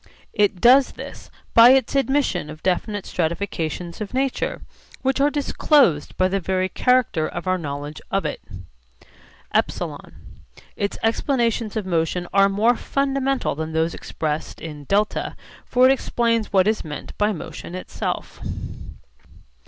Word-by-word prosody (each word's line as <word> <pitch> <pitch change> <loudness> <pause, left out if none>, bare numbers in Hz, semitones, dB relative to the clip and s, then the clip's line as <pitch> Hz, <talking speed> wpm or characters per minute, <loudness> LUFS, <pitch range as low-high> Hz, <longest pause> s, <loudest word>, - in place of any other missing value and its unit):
It 205 -3 +2
does 255 +4 +6
this - - -10 0.2
by 235 +2 +9
its 265 -3 +2
admission 270 - +1
of 155 0 -10
definite 190 +2 -1
stratifications 170 0 -3
of 215 +4 -5
nature 270 0 -1 0.4
which 270 +1 +1
are 285 - +5
disclosed 280 - +2
by 185 - +3
the 195 +1 0
very 185 +1 -1
character 250 -12 +2
of 175 - -6
our 185 0 +1
knowledge 145 -1 -6
of 195 -3 0
it. 150 - -3 1.1
(ε) - - -2 0.6
Its 200 - -2
explanations 230 -2 0
of 215 -3 -2
motion 175 0 -1
are 195 0 +5
more 220 +5 +3
fundamental 275 +1 0
than 160 +2 -5
those 160 +1 +1
expressed 155 -1 -4
in 150 -3 -8
(δ); 205 +6 0 0.3
for 250 +1 +4
it - - +6
explains 230 -4 0
what 190 -1 +4
is 215 0 +1
meant 150 -2 -7
by 210 +1 +3
motion 175 -1 -7
itself. 185 - -5
200 Hz, 135 wpm, -22 LUFS, 170-245 Hz, 1.1 s, by